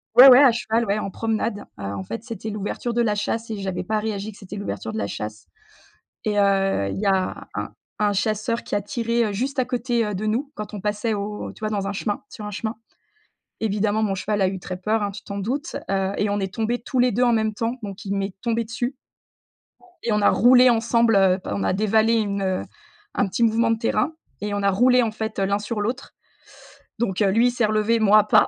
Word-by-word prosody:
ouais, 255 +2 +11
ouais 250 +1 +9
à 265 -4 +7
cheval, 230 0 0
ouais 200 +1 0
en 200 - -3
promenade, 220 0 -2
heu, - - -6
en 100 -1 -4
fait 115 +4 -6
c'était 220 -1 -6
l'ouverture 210 +3 -3
de 240 - +2
la 210 -3 +1
chasse 225 +2 -2
et 215 - -3
j'avais 190 -2 -3
pas 215 +3 0
réagi 210 -1 -3
que 200 - -16
c'était 195 -2 -9
l'ouverture 110 - -5
de - - -4
la 100 -2 -1
chasse 105 +1 -6 0.8
et 210 -1 0
heu, 195 - +2
il - - -4
y 210 - -2
a 190 -1 0
un - - -3 0.3
un 205 -1 +3
chasseur 215 +3 -1
qui - - -3
a 205 - +1
tiré, 230 +2 0
heu, 210 - -2
juste 260 +6 -2
à 250 - +2
côté, 240 -2 0
heu, 210 -2 -3
de 210 - -3
nous 250 +7 -1
quand 210 0 -7
on 205 - -5
passait 210 +2 -1
au 210 +1 -4
tu - - -17
vois? 215 - -2
Dans 200 -2 -2
un - - -1
chemin 205 +1 -3
sur 210 -3 -8
un 210 - -5
chemin. 220 +2 -3 0.9
Évidemment 210 0 +1
mon 200 -2 +1
cheval 205 +2 -1
a 190 - +3
eu 190 - -4
très 180 0 -6
peur, 215 +3 0
hein, 200 - -1
tu 200 - -9
t'en 200 - -7
doutes, 255 +9 -3
heu, 195 0 0
et 205 - +1
on 205 0 0
est 190 -1 -3
tombé 230 +2 -1
tous 255 - -3
les 245 -1 +4
2 245 - +1
en 240 -1 +4
même 220 -1 +1
temps 230 +3 -1
donc 200 -1 -7
il 195 - -1
m'est 195 -1 -2
tombé 230 -1 0
dessus 245 +4 -3 1.1
et 235 - 0
on 210 -1 +2
a - - +5
roulé 250 +1 +6
ensemble, 230 -1 +3
heu, 190 -1 +4
p - - -8
on 100 -1 -2
a - - +1
dévalé 220 +3 +3
une, 200 -3 0
heu 185 -1 0 0.5
un 200 - +2
petit 235 +5 -1
mouvement 230 +1 +3
de 225 - 0
terrain, 230 +7 0 0.3
et 205 0 -2
on 205 - -1
a 200 - +3
roulé 250 +5 +4
en 225 - 0
fait 220 -1 -4
l'un 200 +1 +1
sur 210 0 -3
l'autre 245 +6 -3 0.9
donc 205 -3 -1
heu, 195 - +4
lui 230 +5 +4
il 245 - +2
s'est 240 -2 +1
relevé, 215 +2 +2
moi 215 0 +5
pas, - - +5
215 Hz, 245 wpm, -23 LUFS, 200-230 Hz, 1.1 s, ouais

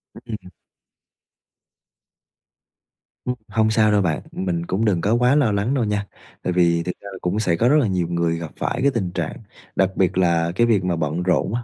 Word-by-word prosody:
Ừm. 110 -5 -8 2.8
Ừm, 125 - -1
hông 110 -1 +2
sao 110 -1 +4
đâu 105 -1 +3
bạn, 80 -4 0
mình 85 -2 -2
cũng 100 +6 -1
đừng 95 -6 +2
có 105 - +1
quá 125 +3 +3
lo 135 -8 +3
lắng 100 +6 0
đâu 130 -4 +1
nha, 105 -1 -1 0.4
tại 90 - -1
vì 85 -1 +3
thực 90 - -2
ra 100 - -8
là 95 - -8
cũng 90 +4 -1
sẽ 90 -6 +1
có 115 +8 +2
rất 150 - +5
là 120 - +2
nhiều 90 -3 0
người 85 -1 0
gặp 85 -2 -6
phải 130 - -2
cái 140 - +3
tình 100 -8 -2
trạng 85 -3 -3 0.4
đặc 95 -1 +3
biệt 95 -1 +1
là 85 -2 +2
cái 120 +3 +3
việc 105 -5 +2
mà 90 -2 0
bận 80 +2 -2
rộn 90 +4 +1
á, 120 - -2
95 Hz, 210 wpm, -22 LUFS, 85-110 Hz, 2.8 s, rất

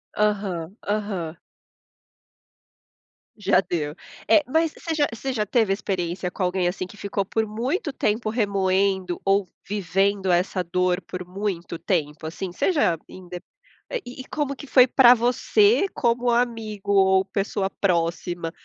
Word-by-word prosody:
Aham, 200 -4 -1
aham. 195 -6 -2 2.0
Já 195 -3 +3
deu. 155 -4 -3 0.3
É, 260 +7 +5
mas 320 +3 +1
você 325 -2 -4
já 290 -1 +3
você 265 +4 -3
já 210 -3 0
teve 220 -2 +2
experiência 180 -3 -3
com 185 - -3
alguém, 180 0 +1
assim, 180 0 -3
que 210 - -14
ficou 200 0 -2
por 220 +2 0
muito 265 - -2
tempo 215 -1 0
remoendo 195 -4 0
ou 195 -1 +2 0.2
vivendo 195 -1 0
essa 180 +1 +1
dor 180 +1 0
por 180 +1 -7
muito 180 -3 -4
tempo? 155 -4 -2
Assim, 175 +3 -5
você 275 - +1
já 180 - +2
inde 180 -1 -9 0.7
e 250 +2 -8
e - - -11
como 290 -2 -1
que 285 - -10
foi 255 -1 +7
pra 245 -1 +7
você 390 - +3
como 240 -1 +1
amigo 225 -4 -1
ou 190 -1 +5
pessoa 195 -1 -2
próxima? 170 -2 -1
195 Hz, 140 wpm, -24 LUFS, 180-230 Hz, 2.0 s, foi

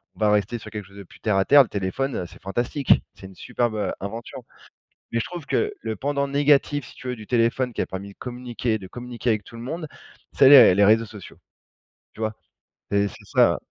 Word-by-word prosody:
on - - -19
va 105 -1 +3
rester 105 +3 +1
sur 110 - -10
quelque 105 -2 -6
chose 100 - -18
de 100 - -8
plus 85 - -19
terre 105 -3 0
à 95 - +3
terre. 145 +6 +7
Le - - -8
téléphone, 105 +7 -2
heu, 90 - -3
c'est - - -16
fantastique. 120 +7 +1
C'est - - -13
une 95 -1 -12
superbe, 120 -2 -2
heu, 105 - -1
invention, 115 +4 -7 0.7
mais 115 - +1
je - - -2
trouve 175 -5 -8
que 425 - 0
le 110 - -4
pendant 140 +3 -1
négatif, 145 0 +2
si - - -14
tu - - -12
veux, 125 - -3
du 110 -2 -11
téléphone 120 +2 +1
qui - - -5
a - - 0
permis 95 +1 -7
de - - -18
communiquer 125 -2 -3
de 95 - -10
communiquer 120 +2 -4
avec 105 -2 0
tout 115 - -13
le 115 - -8
monde, 160 +5 -5 0.5
c'est 135 - +6
les 135 -10 +9
les 100 - +4
réseaux 110 +3 +4
sociaux. 105 -2 -12 0.8
Tu - - -10
vois? 110 0 -1 0.6
C'est 100 0 +2
c'est 100 - -10
ça, - - +4
ouais. - - -4
115 Hz, 240 wpm, -23 LUFS, 105-130 Hz, 0.8 s, les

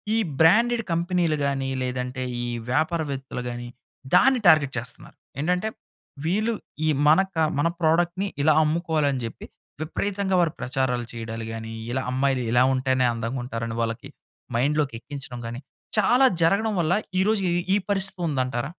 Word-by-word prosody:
ఈ - - +3 0.2
బ్రాండెడ్ 230 +7 +5
కంపెనీలు 170 -2 +1
గానీ, 135 -1 -1
లేదంటే, 125 0 -3 0.2
ఈ - - -3 0.2
వ్యాపారవేత్తలు 145 -5 -1
గానీ, 120 0 -6 0.5
దాన్ని 260 +6 +5
టార్గెట్ 145 -4 +4
చేస్తన్నారు. 115 0 -9 0.2
ఏంటంటే, 180 +7 0 0.6
వీళ్ళు 215 +7 +1 0.3
ఈ - - +2 0.2
మన 155 +5 +6
క - - -9 0.2
మన 165 - +3
ప్రోడక్ట్‌ని 175 +4 +1
ఇలా 155 +1 +5
అమ్ముకోవాలని 155 -4 0
జెప్పి 115 - -7 0.4
విపరీతంగా 195 +4 -1
వారు 170 -3 +2
ప్రచారాలు 125 -2 -1
చెయడాలు 115 -1 -6
గానీ, 115 0 -6 0.2
ఇలా 130 +1 -1
అమ్మాయిలు 130 -1 +1
ఇలా 120 +1 +5
ఉంటేనే 130 -1 +1
అందంగుంటారని 115 -1 -4
వాళ్ళకి 115 +4 -3 0.5
మైండ్‌లోకెక్కించడం 135 -1 -2
గానీ, 120 +2 -6 0.4
చాలా 245 +6 +5 0.2
జరగడం 200 +6 +3
వల్ల 170 +1 +2 0.3
ఈ - - +4
రోజు 210 -3 +1
ఈ - - +1 0.2
ఈ - - +4
పరిస్థితి 190 -2 -1
ఉందంటారా? 130 -2 -1
145 Hz, 135 wpm, -24 LUFS, 125-175 Hz, 0.6 s, మన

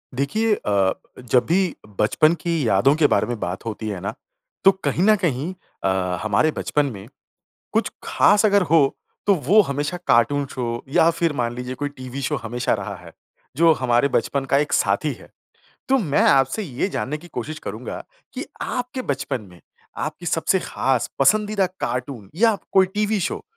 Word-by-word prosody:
देखिए 215 - +1
अ, 100 -2 +1 0.3
जब 125 0 +2
भी 180 0 +1 0.2
बचपन 155 +9 +4
की 165 -8 0
यादों 115 +9 +4
के 155 -2 +4
बारे - - +1
में 120 -2 -4
बात 90 +3 -4
होती 110 -1 -5
है 100 -3 -4
ना, 100 - -3 0.5
तो 195 - +8
कहीं 175 - +1
न 215 +2 +6
कहीं 165 -3 -1 0.3
अ, 95 -1 0
हमारे 110 +9 +2
बचपन 150 -1 0
में 100 -1 -10 0.7
कुछ - - +1
खास 205 +1 +3
अगर 200 -1 +4
हो, 160 -5 +3 0.3
तो 200 - +5
वो 180 +6 +4
हमेशा 145 +1 -2
कार्टून 140 +5 +3
शो 120 -2 -3
या 165 -2 +5
फिर 165 -2 +1
मान 120 0 -1
लीजिए 125 +1 -5
कोई 145 - 0
टीवी 130 -1 -8
शो 150 +3 -1
हमेशा 120 +2 -1
रहा 100 -1 -5
है, 90 -2 -14 0.4
जो 165 +2 +6
हमारे 125 -1 +2
बचपन 135 +2 0
का 135 +1 +2
एक 150 +1 -1
साथी - - +1
है। - - -16 0.6
तो 270 - +5
मैं 160 - +1
आपसे 135 +10 +2
ये 140 0 -2
जानने 150 -5 -3
की 170 +3 -14
कोशिश 155 +6 -5
करूँगा - - -6 0.3
कि - - -5 0.2
आपके 250 +1 -3
बचपन 130 - -3
में 90 - -16 0.4
आपकी 175 - -5
सबसे 170 +3 +1
खास 130 -7 -1
पसंदीदा 210 +7 +3
कार्टून 125 -4 -4
या 225 +3 +4 0.2
कोई 190 -1 +5
टीवी 210 0 +1
शो, - - -3
140 Hz, 175 wpm, -22 LUFS, 120-175 Hz, 0.7 s, तो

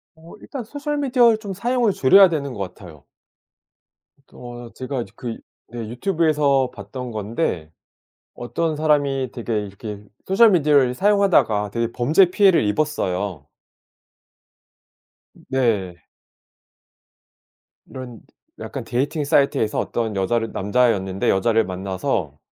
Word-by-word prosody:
어 160 +1 -15
일단 270 -4 -6
소셜미디어를 275 -3 +1
좀 205 -3 -6
사용을 235 +1 +1
줄여야 190 +7 +6
되는 145 -5 -3
것 105 - -8
같아요. 85 -8 -14 1.3
어 120 -1 -10
제가 130 -1 -4
그 120 -2 -6 0.3
네 115 -2 -7
유튜브에서 150 - +1
봤던 120 +5 -7
건데 105 - -3 0.6
어떤 155 +6 -3
사람이 145 -4 +1
되게 115 -3 -3
이렇게 100 +1 -8 0.2
소셜 210 +4 +5
미디어를 145 -7 +3
사용하다가 185 - +2
되게 115 +2 -1
범죄 155 +9 +4
피해를 190 - +4
입었어요. 100 - -2 2.0
네. 105 - -1 1.8
이런 125 -4 -9 0.4
약간 - - -6
데이팅 145 +5 -1
사이트에서 140 -6 +1
어떤 115 -2 -2
여자를 115 +4 -1
남자였는데 100 -3 0
여자를 115 +3 +2
만나서 95 - -3
125 Hz, 260 characters per minute, -21 LUFS, 105-160 Hz, 2.0 s, 줄여야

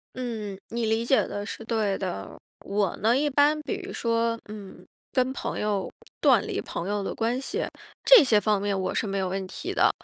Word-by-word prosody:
嗯， 225 -6 -4
你 235 0 -1
理 225 +1 +1
解 265 - +4
的 205 - -4
是 225 - -6
对 215 -4 0
的。 100 - -5 0.3
我 200 -2 0
呢， 230 +4 +3
一 295 +1 +2
般 290 +2 +4
比 400 +2 -3
如 390 - -7
说， 230 0 0
嗯， 195 -3 -10 0.3
跟 255 0 +1
朋 - - -4
友 205 -2 -1 0.3
断 - - +5
离 - - -2
朋 170 - -5
友 205 0 -1
的 - - -3
关 235 +3 0
系， 420 - -2 0.4
这 - - +9
些 225 -5 +4
方 210 -1 +1
面 200 -1 0
我 185 0 -1
是 215 - 0
没 195 0 -2
有 190 -1 0
问 190 +1 -3
题 - - -5
的。 - - +4
220 Hz, 220 characters per minute, -26 LUFS, 200-250 Hz, 0.4 s, 这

